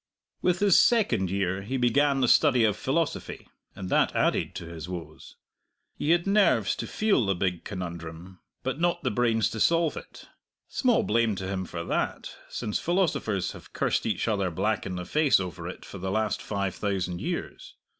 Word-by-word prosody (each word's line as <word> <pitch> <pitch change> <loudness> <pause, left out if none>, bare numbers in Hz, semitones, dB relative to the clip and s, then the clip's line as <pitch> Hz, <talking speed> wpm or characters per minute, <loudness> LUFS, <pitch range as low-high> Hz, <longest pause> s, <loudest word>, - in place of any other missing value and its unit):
With 180 0 +1
his 200 -3 +6
second 125 - +3
year 95 0 -1
he 125 +7 -3
began 135 +3 +2
the 125 - +3
study 130 -2 +5
of 105 -2 +3
philosophy, 145 +9 -2 0.3
and 95 - -6
that - - +2
added - - +1
to 85 - -6
his 85 0 -8
woes. 90 -2 -8 0.6
He 150 - -3
had 170 +1 +3
nerves 200 0 +3
to - - -4
feel 215 - +2
the 95 -2 +1
Big 90 -1 -1
Conundrum, 85 -1 -7 0.2
but - - -2
not 175 -2 +1
the 125 - 0
brains 115 0 +2
to 110 - -5
solve 165 - +3
it; - - -10 0.4
small 250 -4 +2
blame 115 -1 +1
to 95 0 -5
him 95 -1 -3
for 85 -1 -5
that, - - -2
since 105 - -3
philosophers 160 - 0
have - - -13
cursed - - 0
each - - -1
other 100 -4 +1
black 100 +5 -1
in 90 - -4
the 90 0 -5
face 150 - +3
over 90 -5 -5
it - - -8
for 95 - -9
the 95 +1 -3
last 110 +1 0
five 100 -3 -2
thousand 95 -4 -2
years. - - -5
105 Hz, 185 wpm, -27 LUFS, 95-145 Hz, 0.6 s, his